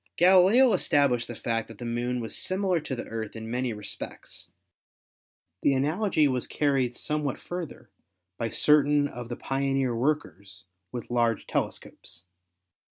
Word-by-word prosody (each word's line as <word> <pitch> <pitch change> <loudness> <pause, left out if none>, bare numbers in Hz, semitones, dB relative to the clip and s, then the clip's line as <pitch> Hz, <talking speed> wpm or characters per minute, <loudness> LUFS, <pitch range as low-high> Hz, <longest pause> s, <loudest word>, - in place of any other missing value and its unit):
Galileo 190 +8 +6
established 130 -5 +2
the 120 - -6
fact 115 0 -2
that 115 - -12
the 120 - -7
Moon 120 +1 -1
was 115 - -4
similar 185 -2 +1
to 145 -3 -4
the 120 - -5
Earth 110 -1 -5
in 110 0 -6
many 125 0 -1
respects. 105 -2 -6 1.1
The 140 - +3
analogy 155 +3 +2
was 130 -2 -1
carried 135 -4 0
somewhat 150 -3 -2
further 175 -3 -7 0.5
by 115 - -1
certain 145 +1 +4
of 120 -3 -8
the 120 - -3
pioneer 135 -2 0
workers 100 - -2 0.3
with 120 0 -6
large 120 -2 +1
telescopes. 85 - -4
130 Hz, 140 wpm, -27 LUFS, 115-150 Hz, 1.1 s, Galileo